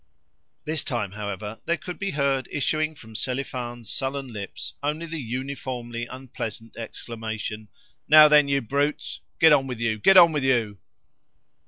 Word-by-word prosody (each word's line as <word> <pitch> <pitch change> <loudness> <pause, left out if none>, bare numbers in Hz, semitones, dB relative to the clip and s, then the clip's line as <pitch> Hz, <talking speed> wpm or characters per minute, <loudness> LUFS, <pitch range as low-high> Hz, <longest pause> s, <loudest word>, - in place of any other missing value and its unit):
This 155 -1 0
time, 110 -6 -2
however, 105 +1 -5
there 170 - +1
could 175 +4 -8
be 195 - -1
heard 140 -4 0
issuing 155 +3 0
from 110 -5 -13
Selifan's 120 -2 -4
sullen 135 0 -3
lips 100 -2 -6
only 150 +3 -2
the 165 -1 -5
uniformly 125 -1 -4
unpleasant 115 -4 -7
exclamation, 110 -1 -6 0.4
"Now 155 0 +9
then, 150 -1 +6
you 140 0 +1
brutes! 140 +5 -2 0.2
Get 160 -1 +7
on 135 -2 +3
with 125 -3 -5
you, 115 -2 0
get 195 - +6
on 170 -2 +9
with 150 -3 -1
you!" 115 -6 +1
130 Hz, 150 wpm, -25 LUFS, 115-145 Hz, 0.4 s, Now